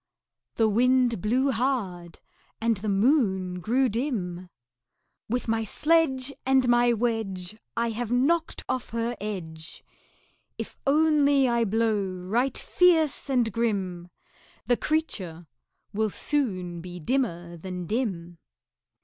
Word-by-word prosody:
The 225 - +3
Wind 245 0 +3
blew 255 +7 +2
hard, 205 -9 -2 0.4
and 230 -1 +1
the 210 +2 -3
Moon 195 -5 +2
grew 250 +9 +2
dim. 200 -8 -3 0.8
"With 245 +2 -1
my 225 0 +1
sledge 280 +1 +2
And 265 -1 +3
my 240 0 +4
wedge 215 -5 -2 0.2
I 235 0 +1
have 230 +1 -4
knocked 315 +7 +1
off 255 -1 -2
her 230 +1 -2
edge! 165 -6 -6 0.7
If - - -6
only 285 -2 +4
I 235 -1 +2
blow 220 0 +1
right 195 +8 -1
fierce 325 -6 +2
and 245 -4 +2
grim, 190 -6 -2 0.6
The 245 +3 +3
creature 190 - -2 0.5
will 215 +1 +1
soon 185 - -2
be 180 0 -8
dimmer 175 - -1
than 180 +1 -6
dim." 175 -6 -3
230 Hz, 115 wpm, -26 LUFS, 185-260 Hz, 0.8 s, my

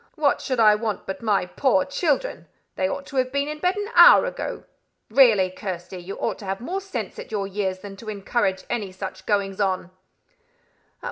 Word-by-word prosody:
"What 295 -2 +1
should 255 -3 -2
I 215 -2 +7
want 210 -2 -3
but 190 0 -5
my 210 -5 +1
poor 190 +1 +1
children? 315 - -1 0.3
They 185 0 0
ought 280 - -4
to 275 - -7
have 255 0 +1
been 280 +1 0
in 300 0 -5
bed 360 +3 +1
an 410 +1 -4
hour - - +8
ago. - - -5 0.5
Really, 220 -7 +5
Kirsty, 185 -1 -6
you 185 +3 -7
ought - - -3
to 205 - -9
have 195 0 -3
more 360 +11 -4
sense 390 0 -6
at - - -8
your 205 -2 -1
years 195 -1 -2
than 200 -1 -9
to 215 +2 -8
encourage 200 -1 -1
any 210 -5 -3
such 190 +1 -8
goings 200 -2 0
on." 185 -2 -1
210 Hz, 195 wpm, -24 LUFS, 190-275 Hz, 0.5 s, hour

